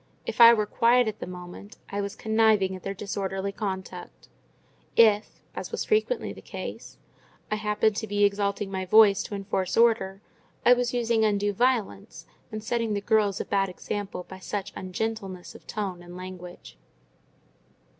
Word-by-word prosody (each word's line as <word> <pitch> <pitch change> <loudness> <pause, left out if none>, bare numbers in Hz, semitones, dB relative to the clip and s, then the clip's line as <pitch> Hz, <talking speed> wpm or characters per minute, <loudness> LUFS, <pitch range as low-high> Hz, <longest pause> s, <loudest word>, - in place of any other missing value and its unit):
If - - -1
I 230 0 +11
were 215 -3 +2
quiet 240 +2 +3
at 215 0 -4
the - - -6
moment, 180 +4 -10
I 200 +1 -2
was 200 0 -4
conniving 220 -3 +2
at 185 - -9
their 195 +2 -4
disorderly 195 0 -3
conduct; 190 -3 -6 0.7
if 215 -2 +4
(as - - -6
was - - -3
frequently 435 +3 0
the - - -12
case) - - -8 0.5
I 215 - +1
happened 210 0 +1
to 220 - -3
be 205 0 +1
exalting 200 0 -1
my 190 -1 -2
voice 205 +1 +6
to 205 - -5
enforce 195 -2 -2
order, 220 -5 +3 0.5
I 245 - +8
was 245 -1 0
using 235 -2 +1
undue 205 -1 +1
violence, 220 - -1 0.3
and 215 -1 -5
setting 230 -1 -1
the - - 0
girls 210 -2 +2
a - - -3
bad 195 -1 +1
example 195 0 -5
by 190 - -10
such 200 +1 -5
ungentleness 190 -1 -4
of - - -15
tone 195 -4 -4
and 175 0 -11
language. 180 - -10
205 Hz, 165 wpm, -26 LUFS, 190-220 Hz, 0.7 s, I